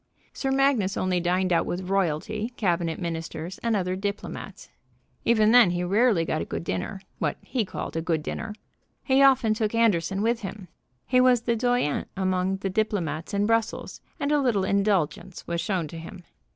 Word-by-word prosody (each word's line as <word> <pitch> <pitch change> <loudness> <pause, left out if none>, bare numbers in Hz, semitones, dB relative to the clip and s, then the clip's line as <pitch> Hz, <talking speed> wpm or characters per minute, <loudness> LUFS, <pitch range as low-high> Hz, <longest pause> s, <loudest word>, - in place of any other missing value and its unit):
Sir 270 - -2
Magnus 270 -8 +2
only 185 -1 +1
dined 180 +1 +1
out 165 - +2
with 180 +1 -3
royalty, 195 +5 -1
cabinet 170 -5 0
ministers, 165 0 -5
and 230 -2 0
other 185 -2 -1
diplomats. 200 +2 -5 0.6
Even 220 -2 +4
then 245 -5 +7
he 175 0 -1
rarely 200 -1 +3
got - - -1
a - - -3
good 85 0 -5
dinner 95 - -3 0.2
what - - -1
he 250 -4 -1
called 190 - -6
a 165 - 0
good 160 -2 -1
dinner. 215 +5 -5 0.5
He 265 0 +3
often 265 -5 +5
took 215 0 -1
Anderson 195 -3 +2
with 230 +1 +1
him. 195 -3 -7 0.4
He 255 0 +3
was 250 -2 +4
the 235 0 0
doyen 245 - 0
among 185 0 0
the 195 0 -3
diplomats 185 -7 -1
in 200 +1 +2
Brussels, 225 0 -1 0.2
and 285 - -1
a 295 -1 +3
little 230 -7 +1
indulgence 190 -3 0
was 170 0 -2
shown 180 -3 -1
to 165 - -8
him. 170 +2 -10
195 Hz, 180 wpm, -26 LUFS, 175-230 Hz, 0.6 s, then